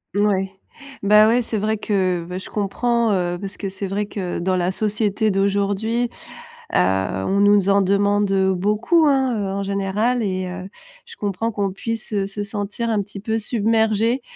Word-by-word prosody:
Oui. 195 -2 +1 0.5
Bah 210 +2 +6
ouais, 240 +2 +3
c'est 225 -1 -3
vrai 215 +1 0
que, 185 -5 0
beh, 180 +1 -5
je - - -9
comprends, 230 +3 0
heu, 175 -1 0
parce 195 0 -6
que 200 - -4
c'est 195 +1 -5
vrai 205 +2 -2
que, 190 -3 -4
dans 185 +2 0
la 180 +1 0
société 210 +1 0
d'aujourd'hui, 200 +4 0 0.6
heu, - - +3
on 95 - +1
nous 205 -1 +4
en 200 0 +4
demande, 200 +1 +2
heu, 190 -1 +2
beaucoup, 210 - +2
hein. 265 -3 +2
Heu, 200 - -2
en 200 0 -2
général 200 +5 0
et 185 -2 -2
heu, 185 +1 -7 0.4
je 470 - -12
comprends 210 +3 -2
qu'on 200 -2 -1
puisse 225 +3 -5 0.2
se 200 +1 -5
sentir 205 +3 -4
un 215 -2 +1
petit 200 0 -9
peu 220 +1 -1
submergé, 225 +2 +1
205 Hz, 175 wpm, -21 LUFS, 195-220 Hz, 0.6 s, Bah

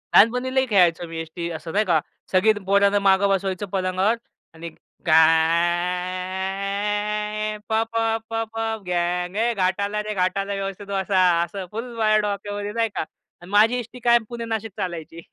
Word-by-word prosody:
लहानपणी 250 +4 +5
लयी 265 0 +3
खेळायचो 175 -4 +3
मी 165 0 -7
एसटी, 170 +1 -5
असं 160 0 -6
नाही 210 +1 +2
का? 165 -4 +3 0.3
सगळी 195 +4 +4
पोरांना 200 +1 +3
मागे 195 0 +4
बसवायचं 195 0 -1
पलंगावर 190 +3 +1 0.4
आणि 165 +1 -8 0.4
घाय 185 +6 +1
प - - -1 0.2
प - - -1 0.3
प 225 0 -1
पप 225 -1 -2
गांग 180 +1 -1
ए 235 +1 +2
घाट 185 -1 0
आला 210 +1 -1
रे, 215 0 -4
घाट 185 0 0
आला 200 +1 -2
रे, 195 - -3
व्यवस्थित 195 +1 -5
बसा, 195 -1 0 0.2
असं 185 +2 -6
फुल 225 +3 -4
वर 215 -1 +3
डोक्यावर 205 0 -3
नाही 225 -1 +1
का? - - -1 0.5
माझी 215 +4 +4
एसटी 245 +2 -9
कायम 235 -1 +4
पुणे 235 -1 -5
नाशिक 225 -1 -3
चालायची. 170 -2 -5
200 Hz, 160 wpm, -23 LUFS, 180-215 Hz, 0.5 s, लहानपणी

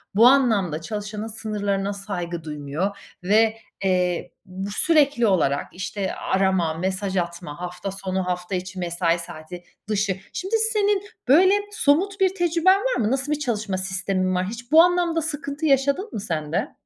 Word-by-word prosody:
bu 230 +3 +7
anlamda 215 - +3
çalışanın 210 +3 -5
sınırlarına 205 -2 -2
saygı 175 -5 -5
duymuyor 150 +6 -3 0.3
ve, 220 +3 +3 0.3
eee, 180 -2 0
bu 190 +2 -6
sürekli 285 -4 +3
olarak, 145 -7 +1
işte, 190 +1 -3
arama, 190 -4 +1
mesaj 190 +3 -2
atma, 170 -2 -4
hafta 180 +2 -5
sonu, 190 -1 -3
hafta 180 +1 -3
içi, 185 +1 -5
mesai 170 -1 0
saati, 170 +1 -9 0.3
dışı. 200 -2 0 0.2
Şimdi, 385 +5 -2 0.2
senin, 410 -2 +2 0.3
böyle, 370 +8 +6 0.2
somut 390 +1 +2
bir 380 0 +2
tecrüben 350 +2 +3
var - - 0
mı? 220 0 +1
Nasıl 270 +2 0
bir 300 - 0
çalışma 215 -8 -2
sistemin 185 0 -1
var? 180 0 0
Hiç 235 +4 -8
bu 320 +1 +9
anlamda 350 -2 +2
sıkıntı 290 0 -3
yaşadın 280 - +2
mı 215 - -3
sen 160 -6 -3
de? 175 - -1
200 Hz, 155 wpm, -23 LUFS, 180-280 Hz, 0.3 s, bu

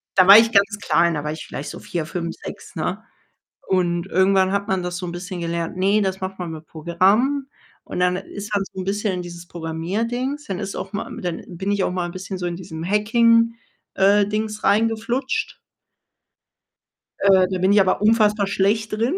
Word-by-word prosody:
Da 185 -1 +5
war 200 +2 +11
ich 225 0 +5
ganz 205 0 +3
klein, 170 +2 +2
da 150 -1 -3
war 150 - -2
ich 155 - -7
vielleicht 145 - -6
so - - -8
4, 170 -4 -4
5, 170 0 -4
6, - - -9
ne? - - -3 0.6
Und 175 -1 0
irgendwann 190 0 +3
hat 200 0 -1
man 190 -1 0
das 175 0 -4
so 180 - -5
'n 170 - -5
bisschen 180 +1 -6
gelernt: 170 0 -3
„Ne, 200 +3 +3
das 190 0 -2
macht 190 0 -5
man 175 -2 -4
mit 160 -1 -9
Programmen.“ 200 - +1 0.4
Und - - -5
dann 180 0 +2
ist 205 +2 -8
man 200 - +2
so 190 - -6
'n - - -4
bisschen 205 +1 -1
in 180 - -3
dieses 175 0 -9
Programmierdings. 220 - -3
Dann 190 -2 -4
ist 195 -1 -5
auch - - -6
mal 205 - -4
dann 175 -3 -4
bin 190 +3 -4
ich 200 -2 +1
auch - - -1
mal 180 -1 -2
'n 170 - -7
bisschen 190 +1 -6
so 180 - -3
in 175 -1 -3
diesem 165 -3 -7
Hacking 230 +3 +3 0.4
äh, 200 +1 +4
Dings 215 0 -3
reingeflutscht. 225 +5 0 1.6
Äh, 190 -2 +5
da 185 -1 -2
bin 185 +2 +3
ich 205 - +6
aber 190 +1 +1
unfassbar 210 -2 +3
schlecht 205 +3 0
drin. 230 +9 0
190 Hz, 205 wpm, -22 LUFS, 175-210 Hz, 1.6 s, war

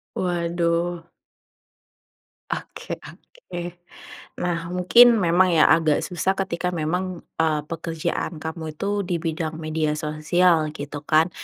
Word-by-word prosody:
Waduh. 170 -1 0 1.5
Oke - - -5
oke. 175 - -9 0.6
Nah 175 -1 0 0.2
mungkin 235 +7 +7
memang 180 +1 +4
ya 160 - +5
agak 160 -1 +4
susah 185 +1 0
ketika 180 -2 -2
memang 180 +2 -2 0.2
e 160 - +3 0.2
pekerjaan 165 -1 -3
kamu 160 -1 -5
itu 200 +5 -2
di 175 -2 -2
bidang 160 -1 -2
media 155 -1 -1
sosial 155 +1 +1
gitu 145 0 -6
kan, 160 +3 +4
170 Hz, 110 wpm, -23 LUFS, 160-180 Hz, 1.5 s, mungkin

